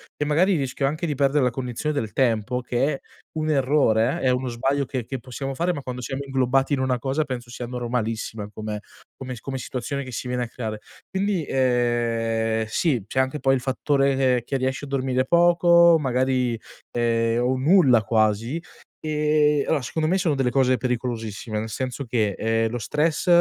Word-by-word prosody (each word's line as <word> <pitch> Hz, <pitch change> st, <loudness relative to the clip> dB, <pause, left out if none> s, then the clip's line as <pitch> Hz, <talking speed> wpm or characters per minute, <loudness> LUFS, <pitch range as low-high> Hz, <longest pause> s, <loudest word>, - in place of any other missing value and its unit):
e 150 Hz, -, -1 dB
magari 175 Hz, +6 st, +3 dB
rischio 135 Hz, 0 st, -2 dB
anche 155 Hz, +5 st, -1 dB
di 150 Hz, -, -2 dB
perdere 140 Hz, +1 st, +2 dB
la 125 Hz, -, +3 dB
cognizione 125 Hz, +4 st, -3 dB
del 110 Hz, -2 st, -5 dB
tempo, 125 Hz, 0 st, +1 dB
che 125 Hz, +4 st, 0 dB
è 135 Hz, -, -5 dB, 0.4 s
un 155 Hz, 0 st, -1 dB
errore, 135 Hz, -2 st, +2 dB
è 130 Hz, -, +2 dB
uno 125 Hz, +1 st, 0 dB
sbaglio, 135 Hz, +4 st, 0 dB
che 130 Hz, -3 st, -4 dB
che 130 Hz, +2 st, -5 dB
possiamo 135 Hz, +3 st, -6 dB
fare, 175 Hz, +5 st, 0 dB
ma 145 Hz, -, -5 dB
quando 125 Hz, -1 st, -6 dB
siamo 135 Hz, +3 st, -4 dB
inglobati 135 Hz, +1 st, +1 dB
in 135 Hz, -, +1 dB
una 130 Hz, -2 st, 0 dB
cosa, 140 Hz, +4 st, 0 dB
penso 120 Hz, -3 st, -6 dB
sia 120 Hz, 0 st, -6 dB
normalissima 115 Hz, -3 st, -3 dB
come 105 Hz, 0 st, -5 dB, 0.4 s
come 130 Hz, -1 st, -6 dB
s -, -, -10 dB
come 135 Hz, -1 st, -4 dB
situazione 130 Hz, +2 st, -4 dB
che 130 Hz, -, -9 dB
si 120 Hz, -, -5 dB
viene 125 Hz, 0 st, -1 dB
a -, -, -4 dB
creare. 110 Hz, -3 st, -5 dB, 0.3 s
Quindi, 190 Hz, -3 st, -1 dB
ehm, 115 Hz, -3 st, +1 dB
sì, 125 Hz, -, 0 dB
c'è 130 Hz, -, -7 dB
anche 130 Hz, +3 st, 0 dB
poi 135 Hz, -1 st, +3 dB
il 130 Hz, -, -2 dB
fattore 135 Hz, +1 st, +1 dB
che 130 Hz, -2 st, +2 dB
che 135 Hz, -, -1 dB
riesci 130 Hz, +1 st, -2 dB
a -, -, -10 dB
dormire 130 Hz, -1 st, 0 dB
poco, 170 Hz, +1 st, +5 dB
magari, 130 Hz, -3 st, 0 dB, 0.3 s
ehm, 115 Hz, 0 st, +1 dB
o 130 Hz, +1 st, +1 dB
nulla 135 Hz, -, +5 dB
quasi, 110 Hz, -, +1 dB, 0.4 s
e 150 Hz, -1 st, +2 dB
allora 150 Hz, -, +1 dB
secondo 155 Hz, +5 st, -1 dB
me, 185 Hz, -, +2 dB
sono 175 Hz, -5 st, +1 dB
delle 135 Hz, -2 st, +1 dB
cose 130 Hz, -1 st, +3 dB
pericolosissime, 115 Hz, -4 st, -3 dB
nel 110 Hz, +1 st, -4 dB
senso 130 Hz, +4 st, -4 dB
che, 115 Hz, -4 st, 0 dB
ehm, 115 Hz, 0 st, +1 dB
lo 120 Hz, -, -3 dB
stress, 150 Hz, -, 0 dB
130 Hz, 190 wpm, -24 LUFS, 120-140 Hz, 0.4 s, poco